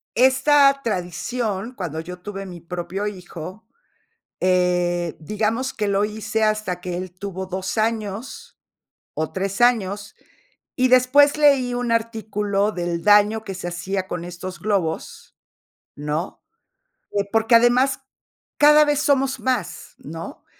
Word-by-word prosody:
esta 275 Hz, +2 st, +5 dB
tradición, 210 Hz, +3 st, -3 dB
cuando 165 Hz, -6 st, -4 dB
yo 180 Hz, +2 st, -9 dB
tuve 195 Hz, +1 st, -7 dB
mi 180 Hz, -2 st, -9 dB
propio 180 Hz, +4 st, -4 dB
hijo, 185 Hz, +1 st, -8 dB, 0.8 s
eh, 180 Hz, -2 st, +1 dB
digamos 220 Hz, +8 st, -1 dB
que 210 Hz, -2 st, -1 dB
lo 200 Hz, +1 st, +2 dB
hice 220 Hz, +1 st, -2 dB
hasta 215 Hz, -4 st, 0 dB
que 180 Hz, -1 st, -4 dB
él 185 Hz, 0 st, -5 dB
tuvo 190 Hz, 0 st, -6 dB
2 185 Hz, +2 st, -4 dB
años, 220 Hz, +1 st, -3 dB, 0.6 s
o 155 Hz, 0 st, -3 dB
3 195 Hz, +3 st, -3 dB
años, 205 Hz, -4 st, +1 dB, 0.6 s
y 255 Hz, 0 st, +2 dB
después 265 Hz, +4 st, +5 dB
leí 275 Hz, -4 st, +4 dB
un 245 Hz, -1 st, -1 dB
artículo 215 Hz, -3 st, -1 dB
del 175 Hz, -2 st, -3 dB
daño 210 Hz, +1 st, +4 dB
que 195 Hz, -, -6 dB
se 180 Hz, -1 st, -5 dB
hacía 185 Hz, +2 st, -3 dB
con 175 Hz, -1 st, -4 dB
estos 175 Hz, 0 st, -7 dB
globos, 185 Hz, -5 st, -3 dB, 0.6 s
¿no? 150 Hz, +4 st, -4 dB, 0.7 s
Eh, 200 Hz, 0 st, 0 dB
porque 225 Hz, +1 st, +3 dB
además 250 Hz, +3 st, +4 dB, 0.6 s
cada 300 Hz, +1 st, +7 dB
vez 295 Hz, -1 st, +1 dB
somos 275 Hz, -2 st, +1 dB
más, 255 Hz, -1 st, -3 dB
¿no? -, -, -9 dB
205 Hz, 130 wpm, -22 LUFS, 180-240 Hz, 0.8 s, cada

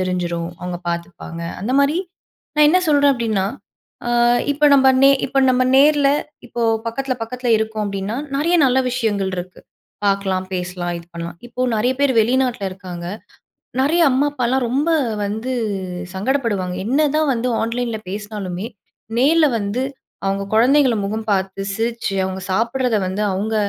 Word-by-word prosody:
தெரிஞ்சிரும், 175 Hz, -2 st, -2 dB
அவங்க 180 Hz, 0 st, -4 dB
பார்த்துப்பாங்க." 170 Hz, 0 st, -5 dB, 0.2 s
அந்த 220 Hz, +7 st, -2 dB
மாரி. 280 Hz, +3 st, +3 dB, 0.6 s
நான் 300 Hz, 0 st, +6 dB
என்ன 365 Hz, +4 st, +5 dB
சொல்றேன் 285 Hz, -1 st, +5 dB
அப்படின்னா, 220 Hz, -6 st, 0 dB, 0.6 s
ஆ -, -, -1 dB, 0.4 s
இப்ப 295 Hz, +1 st, +3 dB
நம்ம 265 Hz, -1 st, +6 dB
நே 275 Hz, -, +8 dB, 0.2 s
இப்ப 270 Hz, -, -1 dB
நம்ம 255 Hz, 0 st, +3 dB
நேர்ல 290 Hz, 0 st, +5 dB, 0.4 s
இப்போ 240 Hz, -, -6 dB, 0.3 s
பக்கத்தில 260 Hz, +3 st, -2 dB
பக்கத்தில 250 Hz, +2 st, -4 dB
இருக்கோம் 220 Hz, 0 st, -2 dB
அப்படிடீன்னா 200 Hz, +2 st, -3 dB, 0.2 s
நெறைய 335 Hz, +5 st, +2 dB
நல்ல 260 Hz, 0 st, +3 dB
விஷயங்கள் 215 Hz, -6 st, -1 dB
இருக்கு. 180 Hz, +1 st, -7 dB, 0.5 s
பார்க்கலாம், 195 Hz, -2 st, 0 dB
பேசலாம், 180 Hz, -1 st, -3 dB
இது 170 Hz, -, -13 dB
பண்ணலாம். 170 Hz, 0 st, -6 dB
இப்போ 250 Hz, +1 st, -2 dB
நெறைய 245 Hz, +4 st, +2 dB
பேர் 280 Hz, -2 st, +3 dB
வெளிநாட்டில 245 Hz, -2 st, +1 dB
இருக்காங்க. 180 Hz, -2 st, -8 dB, 0.7 s
நெறைய 305 Hz, +6 st, +2 dB
அம்மா 265 Hz, +3 st, +2 dB
அப்பாலாம் 255 Hz, -1 st, 0 dB
ரொம்ப 280 Hz, +7 st, +1 dB, 0.3 s
வந்து 220 Hz, +5 st, -3 dB, 0.6 s
சங்கடப்படுவாங்க. 205 Hz, -4 st, -1 dB
என்னதான் 300 Hz, +3 st, +2 dB
வந்து 245 Hz, 0 st, -1 dB
ஆன்லைன்ல 230 Hz, 0 st, -2 dB
பேசினாலுமே, 205 Hz, -2 st, -5 dB, 0.5 s
நேர்ல 310 Hz, +5 st, +5 dB
வந்து 205 Hz, +4 st, -2 dB, 0.4 s
அவங்க 195 Hz, 0 st, 0 dB
குழந்தைகள 255 Hz, +3 st, +4 dB
முகம் 215 Hz, +2 st, -3 dB
பார்த்து, 190 Hz, 0 st, -1 dB
சிரிச்சு, 230 Hz, -1 st, -2 dB
அவங்க 190 Hz, 0 st, -4 dB
சாப்பிடுறத 235 Hz, +3 st, +1 dB
வந்து 190 Hz, +3 st, -2 dB
அவங்க 210 Hz, +4 st, -2 dB
225 Hz, 140 wpm, -20 LUFS, 190-265 Hz, 0.7 s, நே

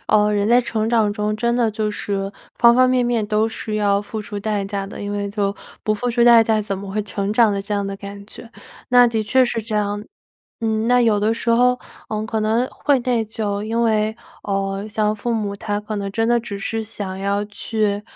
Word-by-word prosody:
呃， 210 Hz, 0 st, +4 dB
人 205 Hz, +1 st, +1 dB
在 245 Hz, +1 st, +6 dB
成 220 Hz, -2 st, -2 dB
长 220 Hz, -3 st, +3 dB
中 210 Hz, 0 st, -1 dB
真 235 Hz, +1 st, 0 dB
的 240 Hz, -2 st, +2 dB
就 215 Hz, 0 st, -2 dB
是 200 Hz, -1 st, -3 dB, 0.3 s
方 235 Hz, 0 st, +7 dB
方 255 Hz, 0 st, +5 dB
面 250 Hz, -1 st, +2 dB
面 235 Hz, -3 st, +1 dB
都 215 Hz, +1 st, +1 dB
是 220 Hz, -1 st, -4 dB
要 200 Hz, -1 st, +2 dB
付 215 Hz, +1 st, -5 dB
出 205 Hz, -1 st, -6 dB
代 210 Hz, -1 st, -1 dB
价 195 Hz, 0 st, -3 dB
的， 195 Hz, -, -8 dB
因 205 Hz, 0 st, -4 dB
为 200 Hz, 0 st, -2 dB
就 200 Hz, -1 st, -1 dB, 0.3 s
不 215 Hz, -, +2 dB
付 245 Hz, +3 st, -2 dB
出 235 Hz, 0 st, +3 dB
代 235 Hz, -1 st, +8 dB
价 220 Hz, -1 st, +1 dB
怎 200 Hz, -2 st, -3 dB
么 195 Hz, 0 st, -7 dB
会 215 Hz, +2 st, -1 dB
成 200 Hz, 0 st, -2 dB
长 220 Hz, -1 st, +4 dB
的 200 Hz, -1 st, -2 dB
这 210 Hz, +1 st, -6 dB
样 200 Hz, -1 st, 0 dB
的 195 Hz, -, -4 dB
感 200 Hz, 0 st, -9 dB
觉， 225 Hz, +2 st, -12 dB, 0.4 s
那 245 Hz, -1 st, +7 dB
的 225 Hz, -2 st, 0 dB
确 255 Hz, +5 st, +3 dB
是 230 Hz, -2 st, -2 dB
这 215 Hz, 0 st, -3 dB
样。 205 Hz, 0 st, -1 dB, 0.6 s
嗯， 220 Hz, 0 st, 0 dB
那 245 Hz, 0 st, +4 dB
有 215 Hz, -3 st, +3 dB
的 220 Hz, +2 st, +2 dB
时 230 Hz, +1 st, -1 dB
候， 250 Hz, +2 st, +4 dB, 0.3 s
嗯， 215 Hz, 0 st, -2 dB
可 220 Hz, 0 st, -2 dB
能 220 Hz, +3 st, +1 dB
会 285 Hz, -3 st, +1 dB
内 240 Hz, -2 st, +1 dB
疚， 205 Hz, -2 st, -3 dB
因 230 Hz, +2 st, -1 dB
为， 220 Hz, -1 st, +1 dB, 0.3 s
呃， 195 Hz, 0 st, -2 dB
像 215 Hz, 0 st, 0 dB
父 230 Hz, +2 st, -2 dB
母 205 Hz, -2 st, -2 dB
他 205 Hz, +1 st, -3 dB
可 210 Hz, +1 st, -5 dB
能 200 Hz, -1 st, -3 dB
真 225 Hz, +3 st, 0 dB
的 240 Hz, 0 st, +3 dB
只 205 Hz, -3 st, -6 dB
是 225 Hz, +3 st, -3 dB
想 205 Hz, -3 st, -6 dB
要 200 Hz, +1 st, 0 dB
去 210 Hz, 0 st, -2 dB
215 Hz, 250 characters per minute, -21 LUFS, 205-230 Hz, 0.6 s, 代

